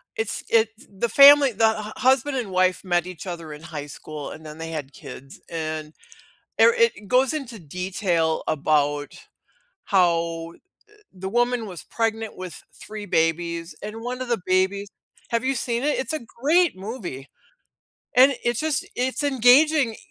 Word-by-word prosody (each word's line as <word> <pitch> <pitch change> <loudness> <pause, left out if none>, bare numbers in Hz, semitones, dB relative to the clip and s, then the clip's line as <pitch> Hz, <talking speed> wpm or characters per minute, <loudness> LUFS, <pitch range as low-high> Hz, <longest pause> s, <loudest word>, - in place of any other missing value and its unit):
it's 220 0 -2
it's 225 -1 +3 0.2
the 200 +4 -2
family 280 +2 +8
the 220 0 +3
hu 210 - -7
husband 265 +2 +2
and 235 -5 -3
wife 185 0 +1
met 175 -2 +1
each 185 0 -9
other 165 -3 -6
in 150 - -11
high 155 -3 -7
school 150 +1 -8
and 160 - -10
then 155 0 -9
they 165 0 -6
had 145 -3 -6
kids, 135 -1 -11
and, 155 -1 -4 0.7
er 470 - +7
it 465 - +1
goes 255 +4 +3
into 260 -7 -5
detail 175 0 -1
about 145 -1 0 0.7
how 170 -3 +1 0.6
the 190 0 -7
woman 240 +1 +1
was 180 -5 -8
pregnant 225 -1 -3
with 185 -3 -8 0.2
3 215 -1 -8
babies, 170 0 -1
and 210 +2 -6
1 250 +2 -5
of 255 - -4
the 235 - +1
babies 190 +2 +1 0.4
have 230 -1 0
you 265 +1 +1
seen 235 0 -2
it? 295 +1 +1
It's 265 - -3
a 310 - -1 0.2
great 335 +5 +3
movie. 185 - -7 0.9
And 265 +2 +6
it's 240 +3 0
just 310 -3 -1
it's 260 +3 -1
engaging, 265 -1 +4
200 Hz, 160 wpm, -23 LUFS, 165-245 Hz, 0.9 s, family